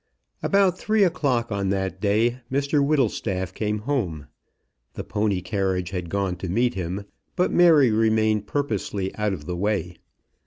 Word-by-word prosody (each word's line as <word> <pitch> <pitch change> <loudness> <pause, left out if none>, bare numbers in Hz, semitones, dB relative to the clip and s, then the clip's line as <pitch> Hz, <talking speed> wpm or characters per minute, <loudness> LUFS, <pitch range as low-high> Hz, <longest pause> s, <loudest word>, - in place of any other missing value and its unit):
About 195 -2 +2
three 215 -1 +2
o'clock 130 -10 0
on 100 -1 -1
that 95 -1 -2
day 115 +4 +2
Mr 140 +1 +1
Whittlestaff 110 - 0
came 105 -1 -1
home. 105 - -2 0.7
The - - -5
pony 105 -3 -1
carriage 95 -2 -1
had 90 -3 -4
gone 95 -1 -1
to 90 0 -5
meet 120 +6 +1
him, 95 +2 -4 0.3
but 180 - +1
Mary 160 -8 +6
remained 110 -1 +2
purposely 105 -8 -2
out 105 -1 0
of 80 -6 -6
the 90 - -3
way. 95 -2 -2
105 Hz, 150 wpm, -24 LUFS, 95-130 Hz, 0.7 s, Mary